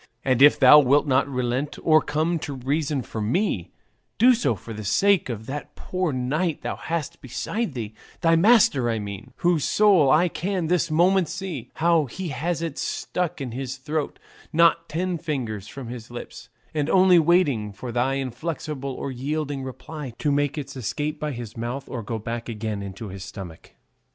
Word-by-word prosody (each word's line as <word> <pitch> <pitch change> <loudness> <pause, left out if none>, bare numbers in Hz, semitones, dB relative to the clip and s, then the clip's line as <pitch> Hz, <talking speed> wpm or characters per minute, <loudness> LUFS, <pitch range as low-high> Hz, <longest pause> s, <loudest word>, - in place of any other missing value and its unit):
And 130 -1 +2
if 145 +1 +8
thou 135 +3 +9
wilt 145 +1 +4
not 130 -1 +2
relent 125 +2 -2
or 155 -1 +5
come 160 +4 0
to 145 -2 -5
reason 140 +1 -1
for 110 - -5
me, 110 - 0 0.5
do 250 +3 +7
so 230 - +1
for 110 +4 -9
the 110 0 -6
sake 195 - +3
of 110 -2 -5
that 145 +4 -6
poor 185 -3 -2
knight 145 +6 -1
thou - - -2
hast 165 -3 -4
beside 145 - -3
thee; 110 -3 -5 0.3
thy 165 0 +4
master 165 - +5
I 115 - 0
mean, 105 +3 -7
whose 170 -4 +1
soul 195 -9 +4
I 160 +5 +5
can 180 +1 -2
this 170 0 +1
moment 175 +2 +3
see, 180 -8 -5
how 165 -1 +3
he 175 +7 -6
has 165 +5 -2
it 165 -4 -4
stuck 180 -4 -2
in 130 -3 -4
his 130 +2 -5
throat 150 +2 -3 0.3
not 170 +1 +3
ten 175 +2 -2
fingers 115 - -4
from 125 +1 -8
his 120 -2 -8
lips, 120 0 -9 0.2
and 150 -1 -1
only 185 -2 +6
waiting 150 - +2
for 110 +5 -7
thy 125 +3 +1
inflexible 135 +1 -4
or 140 - -4
yielding 140 +2 -3
reply 130 +1 -7
to 150 - 0
make 145 +1 0
its 140 -2 -6
escape 150 +6 -3
by 150 0 -2
his 120 -4 -7
mouth 120 +4 -4
or 120 - -5
go 115 +1 -4
back 115 +2 -5
again 110 -2 -3
into 100 +2 -7
his 95 0 -7
stomach." 95 -4 -10
140 Hz, 180 wpm, -24 LUFS, 120-165 Hz, 0.5 s, thou